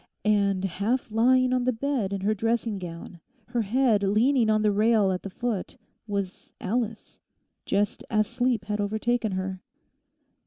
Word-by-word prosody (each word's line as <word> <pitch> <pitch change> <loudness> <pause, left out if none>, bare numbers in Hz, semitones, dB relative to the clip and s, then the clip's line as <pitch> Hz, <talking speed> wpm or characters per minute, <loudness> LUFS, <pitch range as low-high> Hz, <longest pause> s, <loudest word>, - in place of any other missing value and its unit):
And 200 -2 +2
half 210 +7 -1
lying 255 +3 +4
on 250 -1 +1
the 255 - +3
bed 245 -4 -1
in 195 -1 -3
her 210 +3 +2
dressing 225 -1 -1
gown, 175 0 -8 0.3
her 240 -1 0
head 225 0 +2
leaning 225 +4 +3
on 215 0 +3
the 210 - +4
rail 210 -1 +3
at 185 - -2
the 195 - -6
foot, 225 -1 -3 0.3
was 200 -3 -4
Alice, 225 +1 -3 0.5
just 205 +1 0
as 215 -1 +2
sleep 245 -2 -1
had 210 0 -2
overtaken 220 +1 0
her. 185 0 -3
215 Hz, 155 wpm, -26 LUFS, 200-240 Hz, 0.5 s, lying